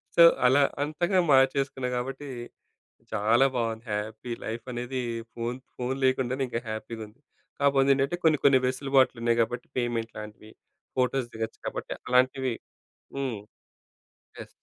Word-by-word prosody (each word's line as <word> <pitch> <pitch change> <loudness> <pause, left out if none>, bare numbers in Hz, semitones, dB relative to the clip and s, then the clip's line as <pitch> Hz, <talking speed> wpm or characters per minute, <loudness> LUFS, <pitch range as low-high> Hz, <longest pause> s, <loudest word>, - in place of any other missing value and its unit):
So, 170 - +6 0.2
అలా 135 +3 +6 0.2
అంతగా 175 +5 +1
మార్చేసుకున్నాం 135 -1 +2
కాబట్టి 135 +3 -4 0.9
చాలా 110 +5 +4
బాగుంది. 115 -1 -1
హ్యాపీ, 110 +3 -4
లైఫనేది 120 +3 -4 0.3
ఫోన్ 120 +1 -3 0.2
ఫోన్ 125 +2 -2
లేకుండానే 130 0 +1
ఇంకా 115 -1 -2
హ్యాపీగా 110 +1 -5
ఉంది. 115 +7 -22 0.4
కాకపోతే 140 -1 +4
ఏంటంటే 140 +6 0
కొన్ని, 155 -3 +4
కొన్ని 135 -2 +7
వెసులుబాట్లు 130 -1 +2
ఉన్నాయి 115 0 +2
కాబట్టి 120 +2 -2
పేమెంట్ 115 -2 -2
లాంటివి 105 0 -10 0.5
ఫోటోస్ 125 -1 +1
దిగొచ్చు 110 0 -5
కాబట్టి - - -4 0.2
అలాంటివి 130 0 +3 0.6
హ్మ్. 130 -6 -2 1.0
యెస్. - - -8
125 Hz, 125 wpm, -27 LUFS, 115-135 Hz, 1.0 s, కొన్ని